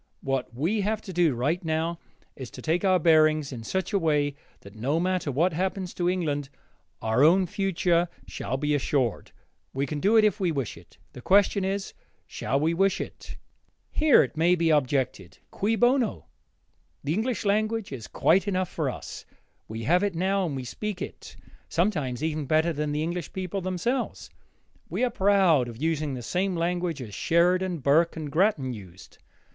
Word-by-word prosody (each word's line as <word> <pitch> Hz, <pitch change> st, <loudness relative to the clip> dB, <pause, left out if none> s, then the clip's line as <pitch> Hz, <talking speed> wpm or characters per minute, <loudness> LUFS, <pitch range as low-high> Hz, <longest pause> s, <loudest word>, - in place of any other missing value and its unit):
What 135 Hz, -3 st, -2 dB
we 165 Hz, -, -1 dB
have 215 Hz, +2 st, 0 dB
to 190 Hz, -, -8 dB
do, 170 Hz, -6 st, +2 dB
right 145 Hz, +10 st, -1 dB
now, 160 Hz, +1 st, -1 dB, 0.4 s
is 130 Hz, -3 st, -8 dB
to -, -, -10 dB
take 165 Hz, +2 st, 0 dB
our 190 Hz, -2 st, +4 dB
bearings 155 Hz, -3 st, +3 dB
in 115 Hz, -2 st, -7 dB
such 190 Hz, -, -3 dB
a 200 Hz, -, +3 dB
way 150 Hz, -4 st, +1 dB, 0.3 s
that, 100 Hz, -, -13 dB
no 135 Hz, +9 st, -1 dB
matter 180 Hz, -4 st, 0 dB
what 165 Hz, +7 st, +1 dB
happens 185 Hz, +2 st, -2 dB
to 175 Hz, 0 st, 0 dB
England, 150 Hz, -6 st, -1 dB, 0.5 s
our 110 Hz, +4 st, +2 dB
own 180 Hz, +5 st, +5 dB
future 175 Hz, -2 st, +1 dB, 0.2 s
shall 130 Hz, -, -4 dB
be 150 Hz, +2 st, 0 dB
assured. 135 Hz, -4 st, 0 dB, 0.4 s
We 135 Hz, +1 st, 0 dB
can 150 Hz, +1 st, -4 dB
do 210 Hz, +8 st, +4 dB
it 220 Hz, -, +6 dB
if 210 Hz, +1 st, +1 dB
we 180 Hz, -3 st, +1 dB
wish 135 Hz, -7 st, -3 dB
it: -, -, -17 dB, 0.2 s
the 125 Hz, -, -10 dB
question 200 Hz, -, +3 dB
is, 195 Hz, +1 st, -2 dB, 0.3 s
shall 135 Hz, -, -2 dB
we 160 Hz, +3 st, +1 dB
wish 195 Hz, +3 st, +2 dB
it? -, -, -8 dB, 0.5 s
Here 305 Hz, -, +5 dB
it 135 Hz, -, -6 dB
may 170 Hz, +3 st, +3 dB
be 165 Hz, -2 st, +2 dB
objected, 130 Hz, -, 0 dB
Cui 215 Hz, +3 st, 0 dB
bono 245 Hz, -1 st, +2 dB, 0.8 s
The 145 Hz, -, -1 dB
English 220 Hz, +2 st, -1 dB
language 215 Hz, +1 st, 0 dB
is 120 Hz, -5 st, -7 dB
quite 190 Hz, +5 st, +2 dB
enough 185 Hz, -2 st, 0 dB
for 155 Hz, -5 st, -2 dB
us. -, -, -7 dB, 0.4 s
We 110 Hz, +1 st, -6 dB
have 175 Hz, +9 st, +3 dB
it 200 Hz, -3 st, -1 dB
now 190 Hz, +2 st, +1 dB
and 145 Hz, -, -4 dB
we 130 Hz, -, -4 dB
speak 205 Hz, -, -5 dB
it, -, -, -9 dB, 0.3 s
sometimes, 155 Hz, -, 0 dB
even 155 Hz, -3 st, -2 dB
better 160 Hz, +3 st, +2 dB
than 150 Hz, 0 st, -2 dB
the 150 Hz, +1 st, -1 dB
English 170 Hz, 0 st, -4 dB
people 190 Hz, +1 st, -3 dB
themselves. 185 Hz, +8 st, -2 dB, 0.6 s
We -, -, -1 dB
are 250 Hz, -, +2 dB
proud 190 Hz, -9 st, +3 dB
of 115 Hz, -1 st, -9 dB
using 155 Hz, -2 st, -1 dB
the 125 Hz, -, -7 dB
same 185 Hz, +6 st, -1 dB
language 170 Hz, -3 st, -1 dB
as 105 Hz, -4 st, -10 dB
Sheridan, 175 Hz, -, +1 dB
Burke, 155 Hz, +5 st, +3 dB
and 150 Hz, -3 st, -5 dB
Grattan 155 Hz, -, +1 dB
used. 95 Hz, -4 st, -12 dB
165 Hz, 180 wpm, -26 LUFS, 145-190 Hz, 0.8 s, it